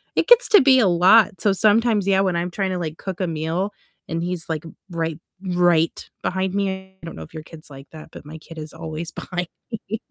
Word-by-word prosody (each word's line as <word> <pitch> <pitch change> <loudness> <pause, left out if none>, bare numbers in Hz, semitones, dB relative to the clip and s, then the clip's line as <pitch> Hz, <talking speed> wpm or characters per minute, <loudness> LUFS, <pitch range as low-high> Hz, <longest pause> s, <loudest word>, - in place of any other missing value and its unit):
it - - +1
gets 485 0 +6
to 420 -2 +8
be 260 -1 +6
a 220 - +4
lot, 190 +4 +5
so 205 -3 +3
sometimes, 215 +1 +3
yeah, 195 -1 +3
when 185 -3 0
I'm 175 +1 -2
tryna, 190 -1 -2
like, 160 -1 -5
cook 190 -1 -6
a 185 - 0
meal 165 +5 -2 0.4
and 165 0 -2
he's, 175 -1 -4
like, 160 0 -3 0.3
right 165 -2 -2 0.4
right 175 -2 +2
behind 190 0 -1
me 200 -1 0 0.3
I - - -10
don't 165 - -8
know 80 - -8
if - - -15
your 155 - -6
kid's 155 -1 -14
like 135 0 -12
that, 155 -1 -11
but - - -12
my 160 - -9
kid 165 +1 -13
is 155 0 -8
always 160 0 -6
behind 180 -1 -5 0.4
me. 220 +1 -2
175 Hz, 225 wpm, -22 LUFS, 160-195 Hz, 0.4 s, to